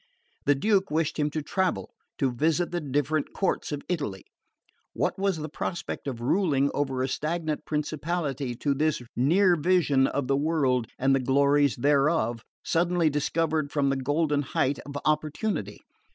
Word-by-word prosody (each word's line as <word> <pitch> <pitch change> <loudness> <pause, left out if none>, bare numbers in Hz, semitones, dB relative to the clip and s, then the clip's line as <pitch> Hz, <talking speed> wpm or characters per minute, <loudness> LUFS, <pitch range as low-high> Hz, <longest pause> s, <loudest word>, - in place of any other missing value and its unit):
The 145 - +4
Duke 195 +5 +2
wished 160 +1 -1
him 150 0 +2
to 155 0 -4
travel, 190 +4 -1 0.3
to 135 -3 +1
visit 160 +7 0
the 175 -1 -2
different 145 +1 -1
courts 195 - -1
of 145 -1 -4
Italy: 140 - -3 0.7
what - - -1
was 195 -3 +1
the 155 0 -4
prospect 170 0 -5
of 120 -4 -4
ruling 140 -1 +2
over 135 -3 -1
a - - 0
stagnant 155 +2 -2
principality 150 -3 -2
to 140 +4 0
this 150 -2 0
near 175 +8 +4
vision 150 -5 +3
of 140 -3 -2
the 135 - +2
world 140 -5 +1
and 135 +1 +2
the 135 - +3
glories 140 +1 +3
thereof, 140 -3 +2 0.2
suddenly 170 -1 +2
discovered 155 0 0
from 140 -2 +1
the - - +1
golden 145 +2 0
height 135 0 0
of 145 0 -5
opportunity? 155 - -1
145 Hz, 155 wpm, -27 LUFS, 135-165 Hz, 0.7 s, The